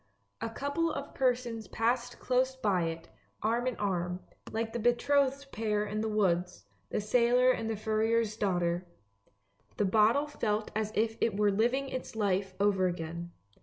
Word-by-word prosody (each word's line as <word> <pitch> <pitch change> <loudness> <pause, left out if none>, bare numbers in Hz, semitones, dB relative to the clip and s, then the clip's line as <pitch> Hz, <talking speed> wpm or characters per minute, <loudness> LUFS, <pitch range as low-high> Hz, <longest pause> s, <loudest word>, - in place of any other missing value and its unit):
A 230 - -2
couple 285 +8 -1
of 280 -1 -5
persons 240 -4 0
passed 240 +3 0
close 260 +1 +1
by 200 -9 +1
it, 165 0 -5 0.4
arm 235 +3 +1
in 255 - -1
arm, 180 -3 -2 0.3
like 225 0 -2
the 235 - -2
betrothed 275 +4 +2
pair 210 -1 0
in 210 +1 -2
the 220 - -1
woods, 180 - 0 0.2
the - - -1
sailor 245 +4 +4
and 225 -3 -2
the 225 - -1
furrier's 220 +1 +1
daughter. 175 -3 0 0.9
The 205 - +2
bottle 220 +8 +4
felt 215 -7 -2
as 215 0 -1
if 225 +1 0
it 220 -3 +1
were 205 -1 +3
living 245 +7 +1
its 255 -3 -5
life 195 -3 0
over 195 -2 +3
again. 170 0 -5
220 Hz, 160 wpm, -31 LUFS, 195-245 Hz, 0.9 s, sailor